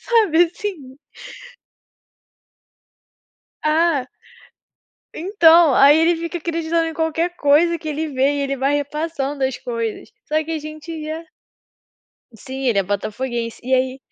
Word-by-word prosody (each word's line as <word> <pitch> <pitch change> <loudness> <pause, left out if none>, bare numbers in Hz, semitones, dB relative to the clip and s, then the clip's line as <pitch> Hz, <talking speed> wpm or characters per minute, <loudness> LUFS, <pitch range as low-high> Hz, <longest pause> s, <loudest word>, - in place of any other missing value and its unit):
sabe, 410 -8 +3
assim. 330 -8 -7 2.7
Ah 310 -3 +2 1.1
Então, 335 -4 +5
aí 285 +2 +7
ele 330 +1 +3
fica 335 +1 -4
acreditando 330 0 -1
em 325 - -5
qualquer 325 +2 -1
coisa 330 +4 +3
que 315 - -7
ele 310 +1 -3
vê 275 0 +1
e 285 - -2
ele 275 0 -2
vai 275 +2 0
repassando 290 -1 -2
as 260 -1 -1
coisas. 230 - -5 0.2
Só 310 +1 0
que 320 - -9
a 320 - -1
gente 310 +1 -8
já 320 +2 -5 1.1
Sim, 265 +4 -7
ele 220 -5 +2
é - - +3
botafoguense. 230 +4 -4
E 260 +1 +1
aí 260 +1 0
305 Hz, 130 wpm, -20 LUFS, 265-330 Hz, 2.7 s, aí